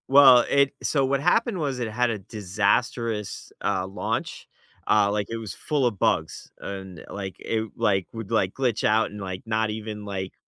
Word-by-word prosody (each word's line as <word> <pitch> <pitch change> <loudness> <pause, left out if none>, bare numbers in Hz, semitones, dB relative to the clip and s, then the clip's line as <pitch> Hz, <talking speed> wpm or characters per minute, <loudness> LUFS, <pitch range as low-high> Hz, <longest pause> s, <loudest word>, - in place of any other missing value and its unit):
Well, 135 -2 +9
it 140 -1 +3
so 140 -3 +2
what 135 +1 +1
happened 190 +5 +2
was 140 -5 -2
it 120 -2 -2
had 125 +2 +1
a 110 -3 -2
disastrous, 105 +2 -1
uh, 95 -2 0
launch, 95 - -3 0.4
uh, 105 -1 +5
like, 105 -1 -1
it 115 - -3
was 110 -6 -6
full 145 - -1
of 110 -6 -1
bugs, 80 +1 0
and, 95 -4 -7
like, 95 -2 -5
it 110 -1 -2
like, 100 -5 +1
would, 115 -3 -7
like, 95 0 +2
glitch 125 -5 0
out 110 +1 +3
and, 105 0 -8
like, 95 -1 -5
not 110 0 0
even, 105 -1 -5
like, 95 -2 -4
110 Hz, 185 wpm, -25 LUFS, 100-125 Hz, 0.4 s, Well